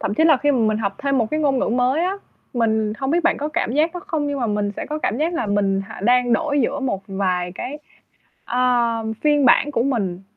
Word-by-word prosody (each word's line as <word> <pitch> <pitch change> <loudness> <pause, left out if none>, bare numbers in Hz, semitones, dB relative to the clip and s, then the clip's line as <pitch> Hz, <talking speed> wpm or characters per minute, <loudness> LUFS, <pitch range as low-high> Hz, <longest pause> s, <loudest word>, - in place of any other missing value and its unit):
thậm 205 - -2
chí 320 - +2
là 315 -3 +6
khi 290 +3 +1
mà 270 - +1
mình 215 -2 +1
học 200 -3 -2
thêm 275 -1 0
một 230 - +2
cái 310 - -1
ngôn 275 -3 +2
ngữ - - 0
mới 250 +6 +1
á, 370 - 0 0.4
mình 220 -3 +1
hông 270 -1 -2
biết 345 +3 +2
bạn 340 - +3
có 295 - -2
cảm 330 -6 -1
giác 305 +5 +2
đó 355 - -5
không, 300 -3 -1
nhưng 285 -1 -2
mà 240 - 0
mình 205 -1 -1
sẽ - - -5
có 305 +1 -4
cảm 235 - -1
giác 330 +3 0
là 330 - -1
mình 200 -1 +1
h - - -8
đang 245 +1 +3
đổi 290 +1 +1
giữa 265 +3 -1
một 245 -8 -2
vài 185 -2 -1
cái, 290 +9 -6 0.7
ờ, 250 - -3 0.6
phiên 295 -2 +3
bản 280 +4 +4
của 235 - 0
mình. 200 -9 -2
255 Hz, 255 wpm, -21 LUFS, 215-295 Hz, 0.7 s, là